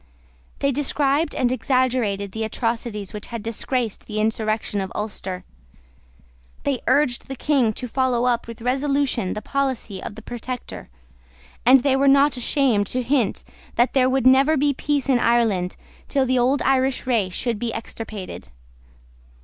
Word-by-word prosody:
They 280 - +1
described 285 +2 +1
and 250 -2 +1
exaggerated 240 -5 0
the 220 +3 -3
atrocities 225 -2 -3
which 210 -1 -6
had 230 -3 -6
disgraced 230 0 -2
the 215 -1 -3
insurrection 215 -1 -1
of 190 - -5
Ulster: 195 -3 -4 1.2
they 275 -3 -1
urged 270 -5 +2
the 270 - -5
King 265 -4 +2
to 250 - -6
follow 250 -1 +1
up 240 -2 +1
with 230 -1 -9
resolution 270 -5 0
the 210 - -6
policy 260 -8 -2
of - - -7
the 225 - -11
Protector; 245 - -6 0.8
and 255 0 +7
they 275 -2 +3
were 275 +1 +3
not 280 +1 +5
ashamed 245 -4 +2
to 255 +4 -2
hint 250 -3 0 0.3
that 240 +2 +2
there 255 -1 +4
would 260 -1 +1
never 270 +4 +5
be 285 +1 +2
peace 285 0 -1
in 260 -3 +3
Ireland 225 -7 +2 0.3
till 275 -2 +1
the 255 0 +2
old 260 +3 +2
Irish 265 0 +1
race 220 -8 +1
should 230 0 -2
be 235 -1 -2
extirpated. 215 - -7
245 Hz, 155 wpm, -22 LUFS, 220-270 Hz, 1.2 s, and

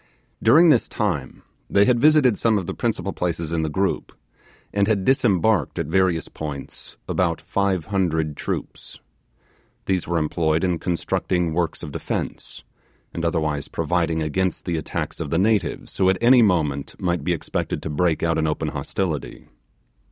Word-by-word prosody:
During 160 +10 +6
this 150 - +4
time 85 - -3 0.3
they 100 0 +4
had 120 0 +3
visited 145 -4 +5
some 110 0 +2
of 95 - -2
the - - -4
principal - - -2
places 85 -2 -2
in 85 -1 0
the 80 - -1
group, 95 +6 -1 0.6
and 100 -1 +2
had 100 -4 +1
disembarked 110 - +2
at 85 - -1
various 90 +1 +1
points 75 -3 -8
about 85 -3 0
five 95 +1 -1
hundred 80 -6 0
troops. - - -5 0.9
These 95 -2 0
were 85 0 0
employed 80 +1 0
in 90 -3 0
constructing 90 -1 -1
works 85 -1 -1
of - - -6
defence, - - -5 0.5
and 85 - -4
otherwise 80 -4 -1
providing 80 -1 0
against 90 +3 -1
the 85 - -1
attacks 80 - -4
of - - -4
the 80 - 0
natives, 100 -3 0
who 95 - +4
at 95 - +2
any 125 +1 +6
moment 75 -9 0
might 85 -4 -1
be 90 - 0
expected 85 - -3
to - - -4
break 80 +2 +1
out 80 -1 +1
in 80 - +1
open 75 - -1
hostility. 85 -7 -4
90 Hz, 160 wpm, -23 LUFS, 80-100 Hz, 0.9 s, During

